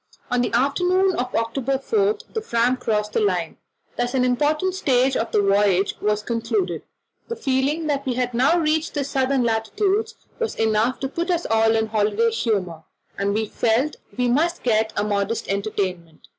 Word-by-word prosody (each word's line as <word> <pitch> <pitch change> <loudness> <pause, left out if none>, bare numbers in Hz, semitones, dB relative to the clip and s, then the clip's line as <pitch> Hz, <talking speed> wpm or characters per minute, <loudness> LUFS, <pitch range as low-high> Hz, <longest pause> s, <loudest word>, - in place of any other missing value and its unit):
On 245 0 +2
the 245 - -1
afternoon 360 +9 +2
of 250 +1 -2
October 245 +4 0
4 415 - +1 0.2
the 445 - -2
Fram 245 - +1
crossed 215 -4 -2
the - - +2
line. 180 -6 -1 0.4
Thus 245 +1 -1
an 255 -1 +2
important 300 +8 +1
stage 265 -7 +2
of 225 - -1
the 205 - +2
voyage 195 -1 +2
was 210 0 0
concluded: 220 -8 -1 0.5
the 465 - -4
feeling 285 - 0
that 285 -2 -1
we 250 - 0
had 250 -1 -1
now 265 +8 +3
reached 315 -1 0
southern 265 -1 +1
latitudes 310 - 0 0.2
was 460 -1 -2
enough 225 +3 +1
to 270 - -1
put 340 +6 -4
us 345 -1 0
all 225 0 +3
in 220 0 +2
holiday 215 +1 +1
humour, 200 -8 -1 0.3
and 200 0 -1
we 220 0 0
felt 230 +7 0 0.2
we 250 -1 +1
must 325 +8 +1
get 220 -2 +2
up 205 - +1
a - - -2
modest 205 +2 -1
entertainment. 190 -5 -3
240 Hz, 175 wpm, -22 LUFS, 215-280 Hz, 0.5 s, now